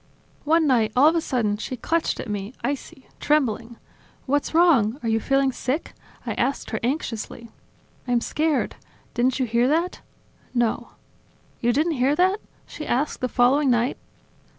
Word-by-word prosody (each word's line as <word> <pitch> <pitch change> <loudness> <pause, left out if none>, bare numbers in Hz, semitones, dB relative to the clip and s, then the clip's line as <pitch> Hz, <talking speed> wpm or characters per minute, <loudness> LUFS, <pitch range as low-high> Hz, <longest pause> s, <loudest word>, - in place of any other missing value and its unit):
One 320 +2 +4
night, 235 -6 +3
all 270 +4 +6
of 320 - +5
a 335 - +2
sudden, 225 -8 0
she 255 +4 -5
clutched 330 +7 -1
at - - -5
me, 205 +3 -4
icy, 270 0 -4
trembling. 240 -6 0 0.5
"What's 290 +3 0
wrong? 275 -10 +4
Are - - -2
you 225 0 +2
feeling 270 +3 +2
sick?" 265 +5 -3 0.3
I - - -2
asked 275 - -1
her 220 - -1
anxiously. 235 -3 -3 0.6
"I'm 245 -1 +2
scared... 300 +4 -1 0.4
Didn't 255 +2 +1
you 260 - +2
hear 235 +1 +2
that?". 335 +5 0 0.5
"No." 240 -2 0 0.7
"You 240 - +2
didn't 305 +4 +1
hear 275 +3 +3
that?..." 375 +5 +2 0.3
she 305 - -8
asked 275 +5 -1
the 255 - 0
following 265 +4 +3
night. 240 +1 +1
260 Hz, 155 wpm, -24 LUFS, 235-300 Hz, 0.7 s, all